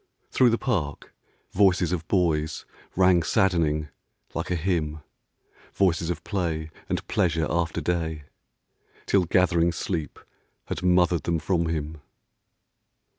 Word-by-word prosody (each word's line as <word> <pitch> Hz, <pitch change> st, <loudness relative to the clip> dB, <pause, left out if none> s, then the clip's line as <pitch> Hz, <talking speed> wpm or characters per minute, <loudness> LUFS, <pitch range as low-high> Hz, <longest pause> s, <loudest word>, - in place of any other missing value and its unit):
Through 125 Hz, -, +4 dB
the 115 Hz, -, +2 dB
park 85 Hz, -, -3 dB, 0.4 s
Voices 95 Hz, -3 st, +3 dB
of 85 Hz, -3 st, -3 dB
boys 80 Hz, -5 st, 0 dB, 0.3 s
rang 90 Hz, -1 st, +5 dB
saddening 80 Hz, -4 st, +1 dB, 0.4 s
like 80 Hz, -, -3 dB
a 90 Hz, -, 0 dB
hymn, 80 Hz, -3 st, -1 dB, 0.8 s
es 85 Hz, -3 st, +2 dB
of 85 Hz, -1 st, -3 dB
play 80 Hz, -5 st, -2 dB, 0.2 s
and -, -, -2 dB
pleasure 80 Hz, -2 st, +1 dB
after 85 Hz, -2 st, -1 dB
day, 80 Hz, -3 st, -2 dB, 0.8 s
Till 95 Hz, -3 st, +2 dB
gathering 85 Hz, -1 st, +3 dB
sleep 80 Hz, -3 st, -4 dB, 0.5 s
had -, -, -4 dB
mothered 90 Hz, -2 st, +3 dB
them 85 Hz, -1 st, +1 dB
from 85 Hz, +1 st, 0 dB
him. 80 Hz, -1 st, -4 dB
85 Hz, 120 wpm, -25 LUFS, 80-90 Hz, 0.8 s, rang